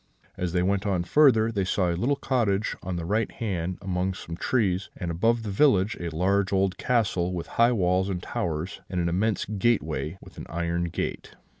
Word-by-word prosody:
As 90 -1 -2
they 90 -1 +2
went 100 +2 0
on 90 -3 +1
farther, 115 -1 +4
they 100 -3 0
saw 90 -1 +1
a - - -1
little 135 +10 0
village 110 -6 +1
on 90 0 -4
the 85 -1 -3
right 105 +4 0
hand 90 -5 -3
among 95 0 -1
some 85 -2 -7
trees; 95 -3 0
and, 85 -1 -3
above 115 +7 +1
the 105 - -4
village, 105 -3 +3
a 85 - -3
large 95 +4 +1
old 95 -1 +1
castle, 95 -7 +1
with 85 - -4
high 115 +1 +3
walls 95 -2 +1
and 90 -2 -3
towers, 85 +1 -3
and 90 -1 -2
an 85 -1 +1
immense 100 +4 0
gateway 95 -6 0
with - - -13
an - - -8
iron 85 +1 -1
gate. 85 - -4
95 Hz, 195 wpm, -26 LUFS, 85-110 Hz, -, farther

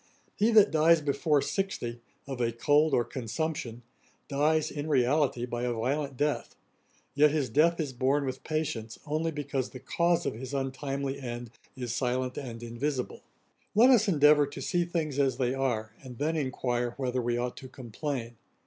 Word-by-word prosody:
He 215 - +3
that 210 -2 +7
dies 160 +1 +5
before 145 0 +1
sixty, 120 -12 -3 0.2
of 135 -3 -5
a 115 -1 +1
cold 145 +6 +3
or 120 - +3
consumption, 125 -1 -4 0.4
dies, 150 +2 +1
in 150 +1 -4
reality, 130 -2 +2
by 120 -1 -4
a 125 0 0
violent 135 +4 -2
death; 150 +2 -1 0.6
yet 150 +1 +5
his 145 -5 -1
death 165 +6 +3
is 145 -5 -2
borne 135 +3 +1
with 130 0 -4
patience 150 -8 -3
only 155 +2 -1
because 140 -4 -3
the 130 - -9
cause 170 +5 +1
of - - -1
his 130 +5 -6
untimely 135 +1 -3
end 120 -2 -6 0.3
is 125 -3 -3
silent 125 0 -1
and 120 -4 -6
invisible. 125 +3 -3 0.5
Let 240 +5 +7
us 220 -4 +5
endeavour 150 -4 +5
to 140 - -8
see 175 +6 0
things 160 -5 -2
as 135 -3 +2
they 125 -1 +1
are, 120 -5 -1
and 125 -3 -10
then 155 +5 0
enquire 125 -4 -1
whether 130 -2 -1
we 120 0 0
ought 125 0 -2
to 130 - -9
complain. 125 -1 -5
135 Hz, 170 wpm, -29 LUFS, 125-150 Hz, 0.6 s, that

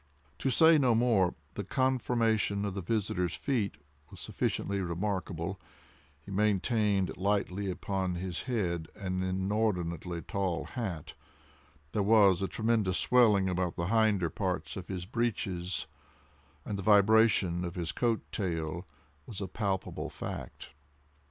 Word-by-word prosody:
To 135 - 0
say 160 +5 +6
no 125 -4 +4
more, 110 -6 +3 0.2
the 105 - -4
conformation 115 -4 +1
of 100 - -2
his 95 -2 -5
visitor's 105 -5 0
feet 110 - -1 0.3
was - - -12
sufficiently 100 -1 -2
remarkable—he 85 -4 -5
maintained 100 -2 +1
lightly 100 0 0
upon 95 0 -2
his 90 -1 -4
head 85 -9 -1
an 95 -2 -3
inordinately 95 -3 -1
tall 95 -4 -2
hat—there 80 - -7
was 100 -3 +5
a 95 - 0
tremulous 110 -2 +1
swelling 110 -6 +4
about 90 -1 -1
the 85 +2 -2
hinder 105 -6 +2
part 95 -2 -2
of 95 -2 -7
his 90 -2 -4
breeches—and 80 - -5
the - - -2
vibration 105 -3 +4
of 85 -1 -5
his 85 -2 -2
coat 115 -2 0
tail 85 -2 -3 0.4
was 105 - -6
a 100 - -3
palpable 95 -1 -3
fact. - - -7
95 Hz, 120 wpm, -30 LUFS, 90-110 Hz, 0.4 s, say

